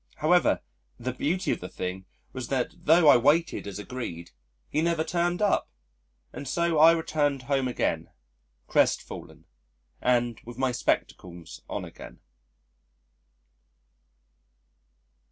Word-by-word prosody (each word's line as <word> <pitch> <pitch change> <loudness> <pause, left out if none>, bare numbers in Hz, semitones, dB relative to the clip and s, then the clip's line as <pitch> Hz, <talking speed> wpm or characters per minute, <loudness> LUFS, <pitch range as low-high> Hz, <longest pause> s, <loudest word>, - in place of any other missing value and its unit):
However, 175 +3 +3 0.4
the 125 0 -4
beauty 175 +8 -1
of - - -1
the 90 - -7
thing 90 +1 -5 0.3
was 130 -2 -5
that, 140 +6 -3
tho' 165 +1 +6
I - - +9
waited 150 +2 +2
as 100 -1 -6
agreed, 105 -7 -6 0.4
he 155 - 0
never 165 -1 +1
turned 175 +3 0
up, 205 - +1 0.6
and 140 - -7
so 170 +2 +1
I 160 +2 +9
returned 145 -4 0
home 135 0 0
again, 125 - -1 0.6
crestfallen - - -1 0.6
and, 120 -2 +1
with 120 0 -10
my 130 -1 +1
spectacles 90 -7 -3
on - - -4
again. - - -12
135 Hz, 120 wpm, -27 LUFS, 120-165 Hz, 0.6 s, I